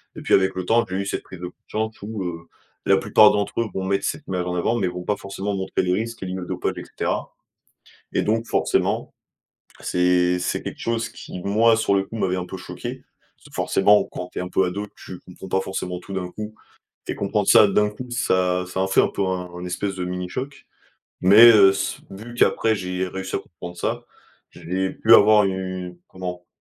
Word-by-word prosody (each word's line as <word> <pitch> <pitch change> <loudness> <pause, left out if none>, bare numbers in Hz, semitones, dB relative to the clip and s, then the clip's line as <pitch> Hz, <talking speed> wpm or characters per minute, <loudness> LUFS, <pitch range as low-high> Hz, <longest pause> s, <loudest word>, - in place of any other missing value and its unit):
et - - -8
puis, - - 0
avec 95 0 +4
le 95 -1 -3
temps, 115 +4 +3
j'ai 95 - -3
eu 100 - -2
cette 100 - -3
prise 95 - -11
de 90 - -5
conscience 110 +4 -5
où, 105 -1 -5
heu, 85 -1 -6 0.4
la 95 - +5
plupart 105 +2 +6
d'entre 105 +2 -1
eux 115 - -1
vont 95 - -3
mettre 100 +1 0
cette - - -3
image 90 -1 -2
en 90 0 -2
avant, 90 +7 +1
mais 100 -6 0
vont 90 0 -5
pas 105 - 0
forcément 100 +1 -4
montrer 95 0 -1
les 90 0 +1
risques 115 +3 -3
liés 95 0 -4
au 90 - -6
dopage - - -2
et - - -5
cetera. - - -3 0.8
Et - - +2
donc 115 +2 0
forcément - - 0 0.7
c'est 90 0 +2
c'est 90 - -2
quelque - - -6
chose 115 0 -1
qui, 90 - -9
moi, 110 +5 +3
sur 110 -3 +1
le 95 0 +2
coup, 110 - -9
m'avait 95 -4 0
un 90 - -3
peu 95 - -7
choqué. - - -7 0.5
Forcément, 105 +2 +3
quand 90 - -6
tu - - -5
es - - -2
un 90 - -5
peu 95 - +2
ado, 100 +3 -3 0.2
tu 90 - -8
comprends 95 +1 -12
pas 95 - +1
forcément 90 -1 -4
tout 100 - -10
d'un 90 -2 -3
coup 105 +3 -7 0.5
et - - -1
comprendre 100 +1 -1
ça 105 - +8
d'un 105 +1 +2
coup, 115 +5 -8
ça 90 -6 +1
ça, 95 +1 -4
en 95 - +1
fait 95 - +4
un - - +2
peu, 100 - -2
un 90 -1 -4
espèce 95 +2 -3
de 90 - -3
mini 90 0 -4
choc. 135 +7 -6 0.6
Mais, 105 +6 +9
heu, 100 -3 +7
s 95 0 -3
vu 110 +5 -9
qu'après 115 -2 +3
j'ai 90 -1 -3
réussi 95 +1 -4
à - - 0
comprendre 90 -1 -10
ça, - - -2 0.5
j'ai 95 +2 -3
pu 115 - +2
avoir 105 0 +7
une, 95 -2 -4
comment? 90 -1 -7
95 Hz, 215 wpm, -23 LUFS, 90-105 Hz, 0.8 s, Mais